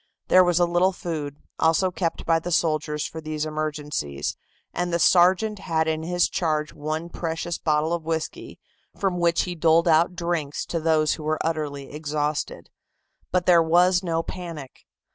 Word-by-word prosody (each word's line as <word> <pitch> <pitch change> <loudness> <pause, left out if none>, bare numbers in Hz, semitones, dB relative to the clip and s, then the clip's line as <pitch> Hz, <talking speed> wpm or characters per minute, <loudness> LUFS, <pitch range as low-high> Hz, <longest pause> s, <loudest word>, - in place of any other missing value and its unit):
There 185 - +7
was 175 -1 +2
a 175 - +5
little 175 +2 +2
food, 155 -5 -5 0.2
also 165 +3 +3
kept 165 -1 -3
by 165 -1 +3
the 175 +2 -5
soldiers 155 -2 0
for 160 - -6
these 155 -1 -3
emergencies, 150 - -3 0.4
and 175 0 -2
the 170 - +2
sergeant 185 +5 +4
had 160 -4 0
in 160 0 -1
his 175 +2 +1
charge 155 -3 -1
one 155 +3 -4
precious 170 0 -4
bottle 155 +1 +1
of 170 - -1
whisky, 160 0 -4 0.4
from 190 -4 -1
which 170 -1 +2
he 180 - -4
doled 165 0 +3
out 165 +2 +3
drinks 170 -5 -2
to 170 - -1
those 155 -1 +2
who 155 - -7
were 155 +1 0
utterly 150 -4 -3
exhausted. 150 0 -3 0.6
But 180 -1 +1
there 175 -2 +6
was 175 +2 +4
no 165 -3 -1
panic. 165 -8 -8
165 Hz, 165 wpm, -24 LUFS, 155-175 Hz, 0.6 s, There